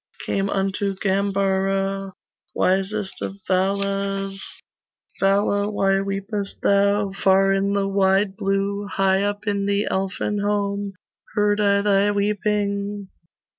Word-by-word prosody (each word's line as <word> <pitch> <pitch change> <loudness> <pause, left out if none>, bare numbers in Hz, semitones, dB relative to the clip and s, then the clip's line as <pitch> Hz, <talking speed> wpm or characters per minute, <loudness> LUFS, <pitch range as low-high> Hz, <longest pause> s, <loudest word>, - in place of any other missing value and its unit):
Came 195 0 -1
unto 195 0 -1
Gambara, 195 0 0 0.4
Wisest 195 +2 0
of 195 - -4
Valas 195 +1 -1 0.8
'Vala, 200 +1 +2
why 195 -2 +1
weepest 195 +1 -4
thou 200 0 +3
Far 195 0 +3
in 195 +1 +1
the 200 -1 +1
wide 195 0 +2
blue, 195 +1 -1
High 190 0 +2
up 205 +1 -2
in 200 -1 0
the 200 +1 +1
Elfin 195 +2 -1
home, 200 -1 -1 0.4
Heard 205 0 +2
I 200 -1 +3
thy 200 0 +3
weeping. 205 -1 -1
200 Hz, 110 wpm, -22 LUFS, 195-205 Hz, 0.8 s, thou